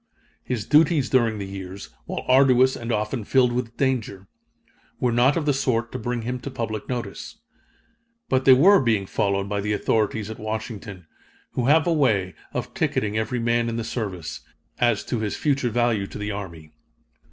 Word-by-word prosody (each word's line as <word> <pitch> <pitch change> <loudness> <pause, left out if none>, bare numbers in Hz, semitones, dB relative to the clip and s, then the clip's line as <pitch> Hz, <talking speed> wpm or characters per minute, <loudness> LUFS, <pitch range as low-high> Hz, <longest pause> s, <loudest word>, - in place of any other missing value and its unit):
His 115 -5 -3
duties 150 -3 +3
during 115 -4 +2
the 100 - -4
years, 95 0 -8 0.2
while - - -5
arduous 130 0 +5
and 120 0 -5
often 105 0 -1
filled 125 +2 +3
with 120 -1 -3
danger, 115 -8 -1 0.7
were 125 - +1
not 125 +5 +3
of 160 - -1
the 145 - +3
sort 120 -3 0
to 130 - -5
bring 120 0 -3
him 125 +2 -3
to 130 - -6
public 115 -5 -5
notice. 120 -6 -5 0.9
But 130 0 +1
they 130 - +9
were 185 +10 +6
being 110 -6 +1
followed 100 0 -1
by 100 0 -2
the 105 +1 -1
authorities 110 0 0
at 110 - -9
Washington, 110 -4 -6 0.5
who 125 -1 -1
have 155 +2 +5
a 170 - +2
way 105 - +1 0.2
of - - -4
ticketing 105 0 -1
every 110 +3 -1
man 115 0 +1
in 115 - -3
the 115 - -2
service, 95 -8 -5 0.4
as 120 -4 +2
to 120 - -2
his 105 -2 -2
future 140 -4 +1
value 115 -4 +1
to - - -9
the 105 0 -3
army. 85 -6 -7
115 Hz, 180 wpm, -24 LUFS, 105-130 Hz, 0.9 s, they